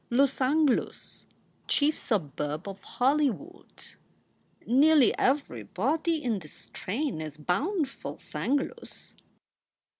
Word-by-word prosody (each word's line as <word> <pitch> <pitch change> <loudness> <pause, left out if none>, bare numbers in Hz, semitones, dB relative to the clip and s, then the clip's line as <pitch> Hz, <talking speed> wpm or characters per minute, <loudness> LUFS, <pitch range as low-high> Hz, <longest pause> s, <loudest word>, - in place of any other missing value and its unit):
"Lussanglus 275 +2 +1 0.4
chief 300 +2 +3
suburb 150 - -2
of 195 0 -7
Hollywood. 290 - -1 0.8
Nearly 285 +2 +5
every 280 +2 +1
body 305 - 0
in 230 -5 0
this 155 -4 -13
strain 235 - -4
is 155 -1 -6
bound 285 - 0
furl - - -8
Sanglus." 280 +1 -3
265 Hz, 90 wpm, -28 LUFS, 195-300 Hz, 0.8 s, Nearly